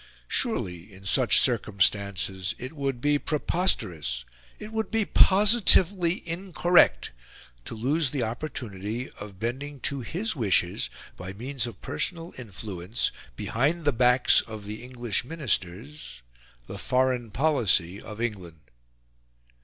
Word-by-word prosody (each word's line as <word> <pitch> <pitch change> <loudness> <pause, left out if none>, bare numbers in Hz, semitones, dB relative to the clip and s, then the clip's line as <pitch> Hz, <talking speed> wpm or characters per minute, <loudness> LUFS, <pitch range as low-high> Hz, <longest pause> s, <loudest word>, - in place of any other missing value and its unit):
Surely, 100 - -1
in 95 0 -15
such 125 +5 +4
circumstances, 100 -3 0
it 130 +4 -7
would 135 -4 -3
be 145 +1 +2
preposterous, 95 - 0 0.3
it 210 +1 -9
would 220 0 -2
be 225 -1 0
positively 190 -4 +5
incorrect, 175 0 +2 0.5
to - - -6
lose 140 +6 +1
the 135 -2 -2
opportunity 115 -2 -5
of 100 -2 -10
bending 135 +5 -4
to 140 +2 -2
his 185 - -3
wishes 95 -8 +1 0.3
by 90 +1 -7
means 125 +3 -3
of 120 - -11
personal 170 -1 -3
influence, 105 -3 -4 0.2
behind 150 - -1
the 145 - +3
backs 125 +1 +4
of 110 -2 -8
the 105 +2 -7
English 120 -4 -2
Ministers, 120 - -4 0.4
the - - -8
foreign 125 -2 0
policy 105 - +1
of 105 0 -10
England. 95 -9 -4
120 Hz, 120 wpm, -26 LUFS, 100-150 Hz, 0.5 s, positively